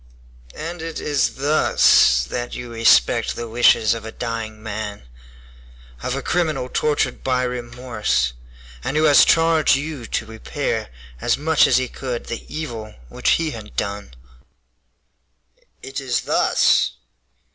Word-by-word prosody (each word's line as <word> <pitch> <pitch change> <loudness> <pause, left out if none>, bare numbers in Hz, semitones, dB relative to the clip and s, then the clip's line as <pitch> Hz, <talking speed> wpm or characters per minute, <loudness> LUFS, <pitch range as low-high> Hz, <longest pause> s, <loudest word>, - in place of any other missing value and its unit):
"And 170 +2 -6
it 165 -1 -5
is 145 -3 0
thus 135 - +4
that 120 - -5
you 120 -1 -7
respect 115 - +3
the 120 - -5
wishes 115 -1 +4
of 115 - -6
a 110 - -7
dying 110 -2 -5
man, 105 -1 -5 1.0
of 125 - -2
a 135 - -4
criminal 155 -7 -1
tortured 145 -4 -1
by 130 -1 +1
remorse, 120 - -2 0.5
and 150 - -2
who 155 - +3
has 150 -2 +7
charge 165 -3 +4
you 140 -4 -5
to 115 - -2
repair 110 - -4 0.3
as - - +1
much 155 +2 +3
as - - +4
he 130 0 0
could 125 -1 -5
the 115 - -7
evil 115 -9 -6
which - - +1
he 165 -2 -2
had 110 -3 -10
done?" 100 -12 -4 1.7
"It 135 0 -5
is 125 -3 -1
thus." - - +2
125 Hz, 135 wpm, -21 LUFS, 110-145 Hz, 1.7 s, has